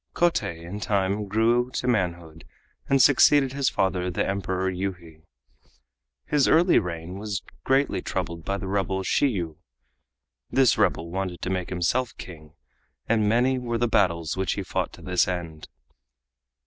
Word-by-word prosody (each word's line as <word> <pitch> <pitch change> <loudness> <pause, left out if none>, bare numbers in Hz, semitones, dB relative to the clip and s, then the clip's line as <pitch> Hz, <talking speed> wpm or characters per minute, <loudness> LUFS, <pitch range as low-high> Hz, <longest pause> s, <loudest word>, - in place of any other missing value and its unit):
Kotei 100 - 0
in 100 +5 -6
time 100 0 -1
grew 115 +4 +2
to 125 - -2
manhood 85 -8 -2 0.5
and 135 - +4
succeeded 140 0 +5
his 140 -1 +1
father 90 -1 0
the 90 - -1
Emperor 95 -1 -2
Yuhi. 90 -4 -6 1.0
His 145 -2 +2
early 170 +3 +5
reign 90 +1 -6
was 105 -2 -4 0.2
greatly 135 +2 +2
troubled 85 0 -4
by 100 +4 -2
the 100 - -6
rebel 95 -1 -1
Shiyu. 90 - 0 0.9
This 130 -3 +4
rebel 85 +1 0
wanted 95 -1 -3
to 95 - -2
make 90 -1 -2
himself 115 +8 -1
King, 80 -3 -11 0.5
and 110 -2 +2
many 125 +3 +2
were 120 -2 -2
the 120 +1 +1
battles 85 -7 +1
which 95 -1 -1
he - - -4
fought - - -2
to - - -13
this 90 -1 +1
end. 85 -4 -5
95 Hz, 150 wpm, -25 LUFS, 85-120 Hz, 1.0 s, succeeded